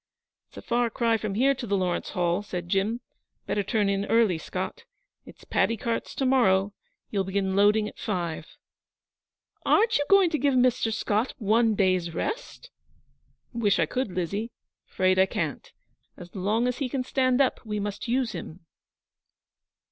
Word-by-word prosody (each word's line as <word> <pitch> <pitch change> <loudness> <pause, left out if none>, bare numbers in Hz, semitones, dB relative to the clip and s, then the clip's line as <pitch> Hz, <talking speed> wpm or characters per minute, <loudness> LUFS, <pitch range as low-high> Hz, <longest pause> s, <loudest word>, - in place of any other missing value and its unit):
'It's - - -19
a - - -8
far 240 -1 +1
cry 230 0 +1
from 215 -3 -3
here 270 +5 +3
to 260 -3 -7
the 200 0 +1
Lawrence 180 -2 -1
Hall,' 175 +1 0
said 180 -4 -6
Jim. 205 +6 0 0.4
'Better 205 - 0
turn 205 +1 0
in 200 0 0
early, 215 -7 +2
Scott. - - -5 0.4
It's - - -14
paddy 230 - +1
carts 230 +2 -3
to 270 - -1
morrow; 205 -7 +3 0.4
you'll 200 -2 0
begin 190 0 -1
loading 210 +2 +4
at - - -11
five.' 170 -6 -4 1.1
'Aren't 450 -1 +3
you 290 - 0
going 390 -4 +5
to 305 - 0
give 280 -1 +2
Mr. 250 -2 +2
Scott 220 +2 -1
one 225 -1 +2
day's 185 -4 +1
rest?' - - -5 0.8
'Wish 220 -4 +2
I 165 - +3
could, 250 - -3
Lizzie. 195 +6 -3 0.4
'Fraid 185 0 +1
I 190 - +5
can't. - - -4 0.5
As 175 -1 -12
long 210 +6 0
as 250 - -2
he 270 -3 -1
can 260 0 -2
stand 255 0 +1
up 270 -2 +1
we 210 -2 -3
must 205 +3 -4
use 245 0 0
him.' 165 +1 -8
215 Hz, 165 wpm, -26 LUFS, 190-250 Hz, 1.1 s, going